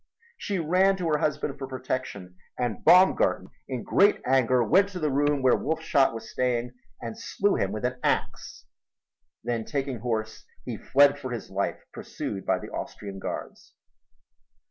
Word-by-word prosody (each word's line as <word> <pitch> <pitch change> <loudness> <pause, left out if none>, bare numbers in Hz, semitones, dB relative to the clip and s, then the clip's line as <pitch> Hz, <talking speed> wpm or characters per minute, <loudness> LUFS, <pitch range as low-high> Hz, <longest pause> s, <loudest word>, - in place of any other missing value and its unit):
She 205 - -3
ran 185 +4 +3
to 180 -3 -2
her 150 -1 +2
husband 150 -2 -2
for 135 - -5
protection 130 -8 -5 0.2
and 120 -5 -2
Baumgarten 185 +1 +4 0.2
in 130 -3 -4
great 200 +2 +4
anger 130 -1 +3
went 190 - +4
to 185 -3 -6
the 155 -3 0
room 145 0 +1
where 130 - +5
Wolfshot 155 -3 +1
was 115 0 -8
staying 120 0 -1 0.3
and 115 -1 -6
slew 200 0 0
him 95 - 0
with 110 +3 -3
an 125 0 -2
ax. - - -2 0.8
Then, 120 -1 -2
taking 135 -2 -3
horse, 110 -1 -3 0.2
he 120 - -4
fled 140 +5 +3
for 130 -2 -6
his 120 -5 -6
life 100 +1 -2
pursued 95 -2 -6
by - - +3
the - - -9
Austrian 100 -2 -6
guards. - - -7
130 Hz, 160 wpm, -26 LUFS, 115-150 Hz, 0.8 s, where